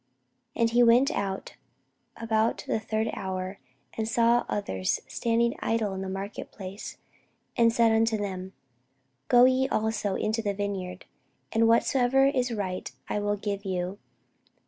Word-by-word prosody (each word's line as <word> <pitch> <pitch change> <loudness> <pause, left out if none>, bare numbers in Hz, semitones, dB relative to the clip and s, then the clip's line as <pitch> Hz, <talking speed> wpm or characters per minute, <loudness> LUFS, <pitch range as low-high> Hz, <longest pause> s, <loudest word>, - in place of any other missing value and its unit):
And 230 -1 +2
he 240 +1 +4
went 245 +4 +5
out 195 -1 -3 0.6
about 225 0 0
the - - 0
third 220 0 -1
hour, 190 0 -4 0.4
and 220 -1 -2
saw 235 +1 +3
others 95 - -1
standing 235 0 +1
idle 220 -3 0
in 190 - -4
the 190 - -4
marketplace, 195 0 -7 0.6
and 230 -1 +4
said 230 0 +4
unto 225 0 +2
them; 190 -2 -5 0.7
Go 245 - +7
ye 260 +1 +3
also 215 -2 0
into 220 +1 -1
the 205 -2 -2
vineyard, 190 -2 -4 0.5
and 225 0 +3
whatsoever 250 +3 +3
is 255 -3 +1
right 190 -5 -3 0.2
I - - 0
will 205 0 0
give 200 -1 -3
you. 185 0 -3
220 Hz, 140 wpm, -27 LUFS, 195-230 Hz, 0.7 s, Go